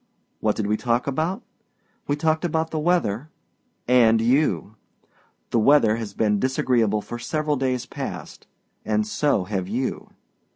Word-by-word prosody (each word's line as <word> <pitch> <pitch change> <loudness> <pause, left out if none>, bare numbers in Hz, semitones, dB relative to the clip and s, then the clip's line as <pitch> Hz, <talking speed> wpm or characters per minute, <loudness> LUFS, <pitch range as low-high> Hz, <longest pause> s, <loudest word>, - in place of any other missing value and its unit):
What 105 -1 +1
did 110 - -2
we 105 +1 +1
talk 120 +1 0
about? 160 +7 -2 0.6
We 145 - +1
talked 155 +2 0
about 160 -1 -1
the 155 - -2
weather 150 - 0 0.6
and 115 -3 +5
you! 115 - +1 0.8
The 115 - +3
weather 115 -3 +4
has 105 -3 -6
been 105 -2 +1
disagreeable 115 -4 +1
for 120 - -7
several 150 +5 -1
days 130 -2 -1
past - - -7 0.4
and 105 0 0
so 110 -1 +1
have 95 -1 -3
you. 125 +6 -3
120 Hz, 140 wpm, -23 LUFS, 105-150 Hz, 0.8 s, and